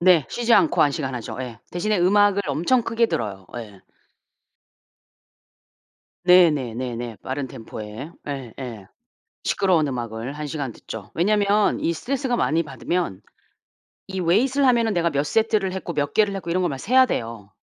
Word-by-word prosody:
네. 175 -5 +5
쉬지 240 0 0
않고 320 - +4
1 145 - +4
시간 135 -3 -3
하죠. 120 -3 -6
예. 120 -3 -7
대신에 210 +5 0
음악을 200 +2 +4
엄청 175 - +2
크게 230 +1 +1
들어요. 100 - -4
예. 105 -5 -9 2.4
네네네네. 130 -9 +3
빠른 135 0 -3
템포에 115 +3 -8 0.2
예예. 125 -6 -6 0.6
시끄러운 180 -6 +2
음악을 120 -1 -4
1 150 +1 -5
시간 140 -4 -4
듣죠. 105 -1 -9
왜냐하면 205 +3 +2
이 165 - +1
스트레스가 255 - -2
많이 165 -6 +1
받으면 150 - -3 0.9
이 190 -1 -4
weight을 250 +11 +3
하면은 230 -4 +3
내가 170 -1 +1
몇 145 +1 0
세트를 215 0 +1
했고 185 -2 -5
몇 145 -1 -1
개를 210 -2 +3
했고 175 -3 -5
이런 185 +2 +1
걸 175 - +1
막 135 - -4
세야 255 - +4
돼요. 115 - -4
165 Hz, 315 characters per minute, -23 LUFS, 125-205 Hz, 2.4 s, 네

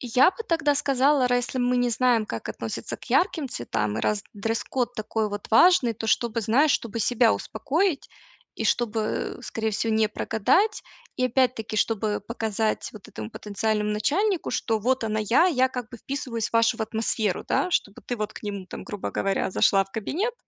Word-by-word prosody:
Я 255 +7 +4
бы 370 - -22
тогда 320 -4 +2
сказала: 275 -1 +3
ра 245 - +3
если 245 +1 -2
мы 250 0 +2
не 245 0 +2
знаем, 235 -2 +2
как - - -6
относятся - - -5
к - - -15
ярким 320 -7 +2
цветам, 110 - -2
раз 210 -1 0
дресс-код 230 +4 -2
такой 215 -1 -2
вот 205 0 -6
важный, 250 -1 +6
то 225 +1 -5
чтобы, 230 +1 +1
знаешь, 260 +8 +3
чтобы 230 0 -2
себя 235 0 +3
успокоить 295 - -1 0.5
и - - -4
чтобы, 225 -2 -1
скорее 220 0 -2
всего, 220 +2 -1
не 220 -1 +3
прогадать 370 - +1 0.3
и, 255 - +1
опять-таки, 245 -3 0
чтобы 215 -1 0
показать 220 0 -2
вот 210 -3 -12
этому 110 0 -7
потенциальному 210 0 -1
начальнику, 330 - 0
что 225 -2 0
вот 255 +2 0
она 215 0 -1
я, 235 - +4
я 260 -7 +3
как 250 -3 -5
бы 240 - -8
вписываюсь 240 -3 -4
в - - -33
вашу 230 0 +3
в 220 - -2
атмосферу, 220 -3 -1
да, 365 - +1
чтобы 205 - -1
ты 245 - -2
вот 210 0 -3
к - - -10
ним 200 -3 -5
там, - - -8
грубо 205 -2 -5
говоря, 195 -1 -1
зашла 195 +1 +3
в 195 - -25
кабинет, 370 - -2
230 Hz, 185 wpm, -25 LUFS, 215-260 Hz, 0.5 s, важный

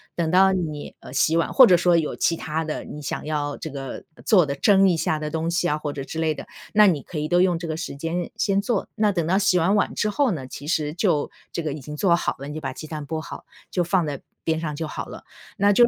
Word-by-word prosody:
等 170 -2 0
到 190 +1 +6
你， 160 -6 -3
呃， - - -11
洗 160 +4 +3
碗 165 - 0
或 260 - +9
者 180 -6 +6
说 175 0 +3
有 160 -3 +1
其 165 - +2
他 160 0 -3
的 155 - -4
你 150 - -8
想 145 - -4
要 145 -2 -2
这 160 - -6
个 135 -2 -6 0.2
做 185 -6 +5
的 140 -1 -3
蒸 195 +5 +5
一 170 - +2
下 155 - 0
的 150 0 -4
东 160 +1 -1
西 175 +1 +1
啊 150 - +1
或 150 -1 -4
者 140 - -5
之 160 +4 -6
类 160 -1 +1
的， - - -8 0.3
那 210 0 +7
你 160 -6 +2
可 165 - -8
以 150 0 -2
都 175 +1 +4
用 180 -2 +3
这 170 - -6
个 155 - -2
时 165 - -5
间 165 +4 -3
先 195 0 +1
做。 215 -2 -1
那 210 -2 +2
等 170 -3 0
到 185 +4 +2
洗 195 -2 +3
完 180 +4 +3
碗 200 - +1
之 210 - +1
后 270 +3 +2
呢， 150 -8 -4
其 145 +2 -9
实 150 -2 0
就 170 -4 +1 0.2
这 170 - -2
个 155 - -2
已 150 - -5
经 150 +2 -8
做 175 +3 +3
好 - - -1
了， 140 +2 -7
你 - - -6
就 155 - -4
把 135 -3 -4
鸡 155 - -8
蛋 155 -2 -6
剥 160 0 -3
好， 155 - -9 0.3
就 180 - +1
放 175 -1 +2
在 145 -3 -4 0.2
边 160 -1 0
上 155 -3 -3
就 160 +2 -3
好 - - -5
了。 - - -10 0.3
那 200 +1 +4
就 235 +4 +6
165 Hz, 300 characters per minute, -24 LUFS, 150-180 Hz, 0.3 s, 或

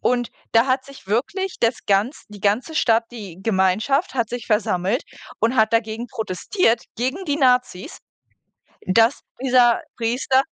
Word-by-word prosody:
und 245 -1 0 0.2
da 230 +3 +4
hat 260 0 +1
sich 275 -8 -14
wirklich 370 - -2
das 235 +1 +2
ganz 205 +9 +1
die 205 -1 -12
ganze 225 +10 0
Stadt 230 -5 +3
die 195 -7 -9
Gemeinschaft 220 - +1
hat 235 -4 0
sich 245 -1 -6
versammelt 210 - 0 0.3
und 230 +3 +1
hat 220 0 +3
dagegen 230 +1 -1
protestiert 225 - 0
gegen 265 - -2
die 290 -3 -1
Nazis, 250 - +1 0.9
dass 225 +7 +3 0.2
dieser 250 0 +4 0.2
Priester 250 +3 +1
235 Hz, 140 wpm, -21 LUFS, 215-260 Hz, 0.9 s, da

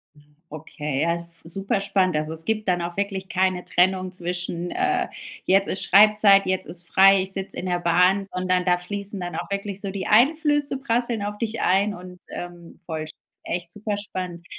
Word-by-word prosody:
Hm, 145 0 -24
okay, 150 -2 -5
ja, 170 +1 -1 0.2
super 195 +4 -2
spannend. 185 -4 +1
Also, 155 +1 -2
es 160 0 -2
gibt 215 0 -1
dann 180 -1 +1
auch 170 +1 -5
wirklich 195 -1 -3
keine 185 -3 0
Trennung 185 +1 +1
zwischen, 175 -1 -4
äh, 375 0 0 0.4
jetzt 195 +1 +3
ist 190 - 0
Schreibzeit, 205 0 +6
jetzt 185 -3 -1
ist 170 0 -4
frei, 195 +2 +6
ich 190 - -5
sitze 195 0 -3
in - - -4
der 175 -1 0
Bahn, 180 +3 +3
sondern 185 0 0
da 180 -1 +3
fließen 200 +2 -5
dann 175 -2 -5
auch 175 +3 -5
wirklich 200 0 -3
so 200 - -4
die 195 -1 -4
Einflüsse 290 +4 +3
prasseln 235 -4 0
auf 205 0 -4
dich 230 +1 -3
ein 195 +3 +2
und, 180 0 -11
ähm, 175 -1 -9
voll 160 -2 -4
sp - - -12 0.3
echt 175 0 -4
super 210 +2 -3
spannend. 185 -4 -6
185 Hz, 190 wpm, -23 LUFS, 175-200 Hz, 0.4 s, Schreibzeit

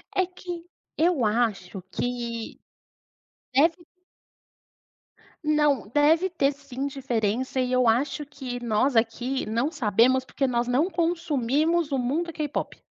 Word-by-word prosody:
É 375 - +3
que 350 -1 -8 0.3
eu 325 -6 +2
acho 210 -4 0
que 235 -2 -4 0.9
deve 330 +5 +3 1.6
Não, 295 -7 +2
deve 310 - +3
ter 285 -5 +1
sim 280 -1 -6
diferença 255 -2 -1
e 255 0 0
eu 255 -2 +3
acho 270 +6 +1
que 255 -4 -6
nós 235 +4 +1
aqui 240 +4 0
não 235 +8 0
sabemos, 255 - +3
porque 270 +1 -2
nós 240 -1 0
não 270 +8 +2
consumimos 330 -2 0
o 275 - +1
mundo 300 +8 -1
K-pop. 295 -2 -4
270 Hz, 120 wpm, -26 LUFS, 240-305 Hz, 1.6 s, É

